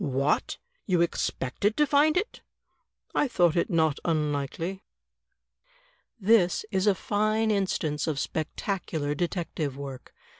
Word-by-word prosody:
"What! 140 -1 0 0.3
you 180 -4 +3
expected 170 - -1
to 300 - +5
find 295 +3 +3
it?" 420 +6 -2 0.7
"I 295 - +2
thought 175 -9 +2
it 170 - +1
not 160 -3 +2
imlikely." 155 +3 -1 1.4
This 200 -3 +3
is 190 +1 +1
a 200 - +5
fine 215 +3 +1
instance 170 -7 0
of 155 -3 -1
spectacular 160 -1 -2
detective 160 -4 -3
work. 135 -2 -8
175 Hz, 115 wpm, -27 LUFS, 150-205 Hz, 1.4 s, to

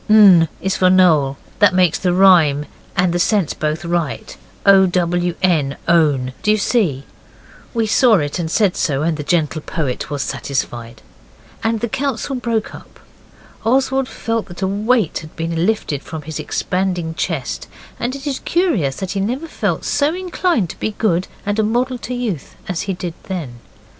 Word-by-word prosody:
N 195 -6 +7
is 190 0 0
for 185 - +4
Noel, 160 -7 +4 0.2
that 205 -4 +5
makes 180 -3 +3
the 180 - +1
rhyme 175 -6 +5 0.3
and 180 -1 +2
the 175 - 0
sense 195 -3 +1
both 155 +2 -2
right. 170 -8 -2 0.3
O, 195 -1 +7
W, 175 -1 0
N, 155 -7 +2
own; 145 -7 +2
do 210 - -1
you 215 - +5
see?' 195 - +1 0.7
We 225 -1 +2
saw 225 +1 +4
it, 145 -1 -1
and 165 -2 -2
said 195 +1 +2
so, 145 -2 0
and 165 0 +1
the 150 - -5
gentle 155 0 0
poet 145 -6 -3
was 145 -2 -2
satisfied. 120 -4 -4 0.6
And 225 -1 0
the 235 - 0
council 270 +2 -2
broke 230 -3 -2
up. - - -13 0.6
Oswald 265 +2 +2
felt 230 -1 -3
that 175 +2 -7
a - - +2
weight 210 0 +1
had 155 0 -12
been 165 +2 -1
lifted 210 -10 -1
from 160 0 -7
his 155 0 -6
expanding 180 -3 -2
chest, 160 -6 -3 0.3
and 245 +3 -2
it 280 0 -9
is 280 -2 -2
curious 240 - 0
that 190 -2 -4
he 200 - -2
never 250 +10 -2
felt - - -2
so 295 +3 +1
inclined 355 - 0
to - - -14
be 215 - -3
good 185 -5 +1 0.2
and 205 +1 -1
a - - +3
model 245 +3 0
youth 235 - -4
as 180 -3 -2
he - - +1
did 175 -2 -5
then. 150 -11 -5
185 Hz, 175 wpm, -18 LUFS, 160-220 Hz, 0.7 s, N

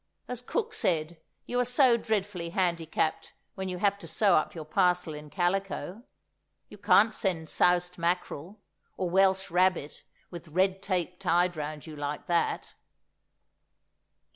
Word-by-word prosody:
As 250 -1 -4
cook 450 - -2
said, 165 - -1 0.3
you 245 - -1
are - - +4
so 250 0 +4
dreadfully 205 -6 -2
handicapped 165 -3 -1 0.2
when 190 -1 -4
you 180 - -4
have 200 +1 +1
to 170 - -10
sew 195 +4 +3
up 155 - 0
your 160 -2 -6
parcel 180 0 +1
in 150 0 -9
calico; 195 +3 -2 0.7
you - - -13
can't 205 +2 +5
send 170 -7 -1
soused 180 0 +2
mackerel, 175 +2 -2 0.4
or 180 -2 -2
Welsh 190 0 +3
rabbit 180 -4 +1 0.3
with 170 -1 -9
Red 190 +4 +1
Tape 180 -2 -2
tied 175 +1 +2
round 150 -1 -5
you 155 -2 -9
like 145 0 -4
that! 170 -1 0
180 Hz, 140 wpm, -29 LUFS, 165-195 Hz, 0.7 s, can't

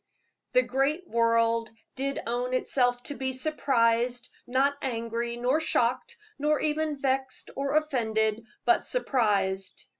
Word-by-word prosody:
The - - +5
great 295 +7 0
world 230 0 +2 0.2
did 275 +1 -2
own 245 +2 -1
itself 245 -1 +1
to 290 - -4
be 265 -1 -3
surprised 245 -3 +1 0.2
not 270 +3 +2
angry, 235 -1 -3
nor 250 +5 +2
shocked, 255 -5 0 0.2
nor 300 +1 +2
even 305 -1 -1
vexed 265 -1 -2
or 275 +2 +1
offended, 220 -7 0 0.2
but 360 - +4
surprised. 195 - 0
255 Hz, 120 wpm, -28 LUFS, 230-280 Hz, 0.2 s, The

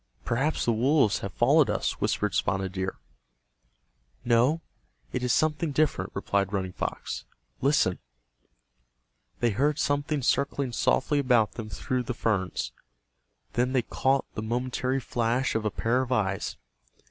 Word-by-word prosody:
"Perhaps 135 +7 0
the 120 - +3
wolves 125 -1 +3
have 100 - -5
followed 140 +7 +4
us," - - -1
whispered - - 0
Spotted 95 +1 0
Deer. 95 0 -3 1.3
"No, 125 +7 +3 0.5
it - - -1
is 125 -1 +1
something 155 +2 +1
different," 150 +2 +1
replied 100 -1 0
Running 95 -2 -2
Fox. - - -4 0.4
"Listen." 135 -10 +2 1.4
They 120 -1 +3
heard 145 +7 +1
something 145 -1 0
circling 140 0 +1
softly 145 +4 +2
about 125 -6 +3
them 110 -2 -7
through 125 +7 -2
the 125 0 -4
ferns. 95 -7 -1 0.8
Then 125 +2 +1
they 130 -3 +2
caught 135 +4 +1
the 105 - -4
momentary 125 +3 -1
flash 120 +1 0
of 110 -1 -1
a - - +3
pair 120 +5 +1
of 130 -1 -4
eyes. 100 -6 0
125 Hz, 135 wpm, -27 LUFS, 110-140 Hz, 1.4 s, followed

